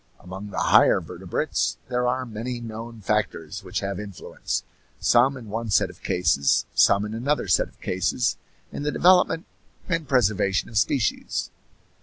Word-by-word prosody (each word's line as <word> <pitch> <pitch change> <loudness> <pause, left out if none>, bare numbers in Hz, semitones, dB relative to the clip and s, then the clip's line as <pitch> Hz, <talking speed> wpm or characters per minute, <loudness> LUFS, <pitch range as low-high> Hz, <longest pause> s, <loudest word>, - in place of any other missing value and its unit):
Among 95 +3 -8
the - - -8
higher - - +5
vertebrates - - -2
there 125 -1 0
are 130 +1 0
many 120 +2 -5
known 115 0 -8
factors 100 -3 -2
which 90 -1 -3
have 100 0 -3
influence, 100 -4 -5 0.4
some 130 +3 +4
in 120 -4 -10
one 115 +2 -3
set 100 - +2
of - - -21
cases, 70 -6 +2
some 100 +1 +4
in 105 - -6
another 135 +7 -1
set - - +3
of - - -24
cases, 95 +6 0 0.4
in - - -6
the 150 +1 -1
development 180 -1 +4 0.4
and 165 -4 -1
preservation 105 -6 +1
of 110 - -4
species. 115 +2 -1
110 Hz, 155 wpm, -24 LUFS, 100-125 Hz, 0.4 s, higher